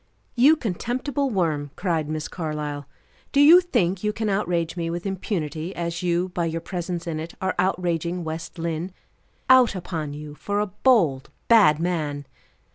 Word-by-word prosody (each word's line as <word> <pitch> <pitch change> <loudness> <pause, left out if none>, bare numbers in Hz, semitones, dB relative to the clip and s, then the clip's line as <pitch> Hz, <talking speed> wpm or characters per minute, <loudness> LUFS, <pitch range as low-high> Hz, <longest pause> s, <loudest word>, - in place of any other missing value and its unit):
"You 270 +6 +6
contemptible 255 - -2
worm!" 160 - -1
cried 165 -5 -1
Miss 155 -1 -3
Carlyle, 150 -4 -4 0.4
"do 280 - +2
you 325 +5 +9
think 190 - 0
you 210 - +1
can 220 0 -2
outrage 175 -4 -1
me 170 -2 -2
with 175 +2 -4
impunity 175 -4 -3
as 170 0 -3
you, 175 +1 0
by 175 -1 -2
your 165 0 -2
presence 175 0 -4
in 160 -2 -3
it, 160 +2 -7
are 190 - -1
outraging 175 -1 0
West 160 0 -6
Lynne? 165 +2 -3 0.5
Out 255 -5 +6
upon 160 -5 -4
you 150 0 -8
for 205 +8 -3
a 210 - +1
bold, 180 - +2 0.2
bad 200 -10 +6
man!" 155 -5 -2
175 Hz, 160 wpm, -24 LUFS, 160-200 Hz, 0.5 s, you